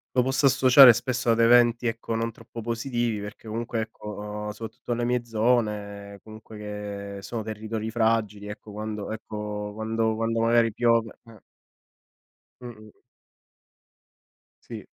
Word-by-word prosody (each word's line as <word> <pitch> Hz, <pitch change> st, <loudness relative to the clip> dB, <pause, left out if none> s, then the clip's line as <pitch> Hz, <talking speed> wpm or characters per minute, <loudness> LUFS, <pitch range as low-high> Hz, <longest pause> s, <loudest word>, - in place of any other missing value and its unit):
lo 125 Hz, -, +5 dB
posso 130 Hz, +2 st, +2 dB
associare 130 Hz, -1 st, +8 dB
spesso 120 Hz, +1 st, -1 dB
ad 115 Hz, -, +3 dB
eventi 120 Hz, +1 st, +5 dB
ecco, 115 Hz, 0 st, -2 dB
non 115 Hz, +1 st, -2 dB
troppo 115 Hz, -, -10 dB
positivi, 120 Hz, -1 st, -2 dB
perché 105 Hz, +2 st, -9 dB
comunque 115 Hz, +1 st, -3 dB
ecco, 110 Hz, -1 st, -9 dB
uhm, 105 Hz, 0 st, -5 dB
soprattutto 110 Hz, +3 st, -7 dB
le 120 Hz, 0 st, -1 dB
mie 120 Hz, 0 st, 0 dB
zone, 105 Hz, -3 st, -1 dB
comunque 110 Hz, 0 st, -12 dB
che 105 Hz, -1 st, -6 dB
sono 110 Hz, +3 st, -5 dB
territori 110 Hz, +1 st, -4 dB
fragili, 110 Hz, -3 st, 0 dB
ecco, 105 Hz, 0 st, -9 dB
quando 105 Hz, 0 st, -5 dB
ecco, 105 Hz, -1 st, -5 dB
quando 110 Hz, +1 st, -1 dB
quando 115 Hz, 0 st, -1 dB
magari 115 Hz, 0 st, +3 dB
piove 115 Hz, -1 st, +2 dB
eh 115 Hz, -3 st, -15 dB, 1.2 s
Mh-mh. 110 Hz, -4 st, -11 dB, 1.7 s
Sì. -, -, -9 dB
110 Hz, 130 wpm, -26 LUFS, 105-120 Hz, 1.7 s, associare